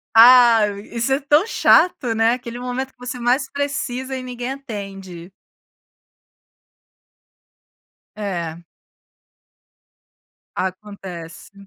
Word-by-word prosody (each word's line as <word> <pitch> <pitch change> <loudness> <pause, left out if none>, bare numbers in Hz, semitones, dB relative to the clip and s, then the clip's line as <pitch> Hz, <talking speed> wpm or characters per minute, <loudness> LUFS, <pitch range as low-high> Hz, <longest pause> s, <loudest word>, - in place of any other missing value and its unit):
Ah, 235 -2 +7 0.2
isso 235 +3 -1
é 270 - +1
tão 295 +5 +3
chato, 320 - +3
né? 225 +1 +3
Aquele 240 -1 -6
momento 250 +1 -4
em - - -27
que - - -47
você 250 0 -6
mais 250 +3 +1
precisa 270 -2 -3
e 255 - -5
ninguém 245 0 -5
atende. 195 -9 -9 2.9
É. 175 -6 -4 2.0
Acontece. 185 -3 -7
240 Hz, 95 wpm, -20 LUFS, 200-260 Hz, 2.9 s, Ah